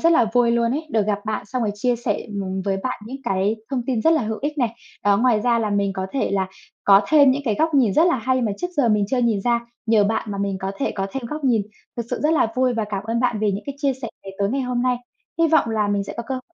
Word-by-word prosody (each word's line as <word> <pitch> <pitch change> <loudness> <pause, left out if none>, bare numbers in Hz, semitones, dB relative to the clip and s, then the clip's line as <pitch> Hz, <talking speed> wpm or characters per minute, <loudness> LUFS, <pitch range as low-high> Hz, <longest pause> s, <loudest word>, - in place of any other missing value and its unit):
rất 335 +1 +4
là 240 -7 +4
vui 245 -1 +4
luôn 235 0 +2
ấy, 315 +3 -3
được 215 -2 +1
gặp 205 -1 0
bạn 215 -2 -2
xong 250 +2 -2
rồi 210 - 0
chia 240 +3 0
sẻ, 225 -3 -1 0.2
ừm, 190 0 -3
với 195 -1 0
bạn 255 -4 -3
những 265 +3 -6
cái 195 +1 +1
thông 255 -3 -1
tin 245 -4 0
rất 325 - +5
là 315 - +2
hữu 220 0 -3
ích 295 +1 -2
này. 240 -3 +2 0.4
Đó, 200 -1 +4
ngoài 230 -2 +3
ra 235 0 +2
là 215 -2 -1
mình 200 -1 +1
có 190 0 -3
thể 275 - 0
là 190 -1 0 0.4
có 195 -1 +7
thêm 285 -3 +6
những 280 +2 0
cái 220 -4 +1
góc 320 +5 +1
nhìn 240 -8 +4
rất 320 - +5
là 345 - +3
hay 255 +3 +1
mà 210 -3 0
trước 355 - -1
giờ 275 -5 +3
mình 210 -2 +3
chưa 260 - +1
nhìn 230 -5 +2
ra, 235 +2 +1 0.3
nhờ 220 -2 +4
bạn 215 0 -1
mà 200 - -4
mình 200 -1 -1
có 190 +1 -3
thể - - -1
có 195 -1 -2
thêm 270 +2 -4
góc 300 +3 -5
nhìn. 230 -5 +3 0.3
Thực 235 -1 -3
sự - - -2
rất 310 +2 +3
là 305 - +3
vui 255 -1 +2
và 220 -2 -1
cảm 200 0 -3
ơn 230 +2 -1
bạn 245 -3 +1
vì 210 - +2
những 200 - -4
cái 280 - -4
chia 280 -2 +1
sẻ 235 - -3 0.2
này 195 - -8
tối 200 0 +1
ngày 270 +2 0
hôm 250 -1 -1
nay. 250 -1 +2 0.4
Hy 330 -1 +4
vọng 310 -7 +3
là 215 -2 0
mình 200 -1 0
sẽ - - -7
có 235 - -3
cơ, 265 - -2
ờ, 255 - -4
230 Hz, 310 wpm, -22 LUFS, 205-260 Hz, 0.4 s, có